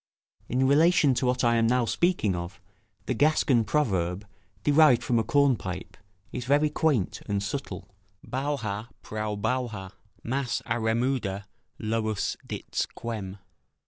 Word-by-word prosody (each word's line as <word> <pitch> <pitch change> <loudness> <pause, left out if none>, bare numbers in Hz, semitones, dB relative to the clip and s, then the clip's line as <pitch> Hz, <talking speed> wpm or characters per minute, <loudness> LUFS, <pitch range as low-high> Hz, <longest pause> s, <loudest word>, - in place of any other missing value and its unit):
In 130 +2 +2
relation 150 0 +5
to 125 +1 0
what 125 +1 +1
I 120 -1 +4
am 115 0 +3
now 125 0 +2
speaking 140 - +1
of, 85 +2 -6 0.5
the - - 0
Gascon 135 -2 +3
proverb, 100 - 0 0.4
derived 145 -4 +5
from 120 -2 +2
a - - +1
cornpipe, 120 -11 0 0.4
is 125 -1 -5
very 145 +3 +3
quaint 150 - 0
and 100 -1 -1
subtle: 100 -5 -5 0.4
"Bouha 125 -6 -2 0.2
prou 105 -1 -3
bouha, 110 -4 -2 0.3
mas 130 0 -2
a 120 - -1
remuda 110 -3 0 0.3
lous 110 -1 -1
dits - - -3
quem." 105 -5 -6
120 Hz, 130 wpm, -27 LUFS, 105-135 Hz, 0.5 s, relation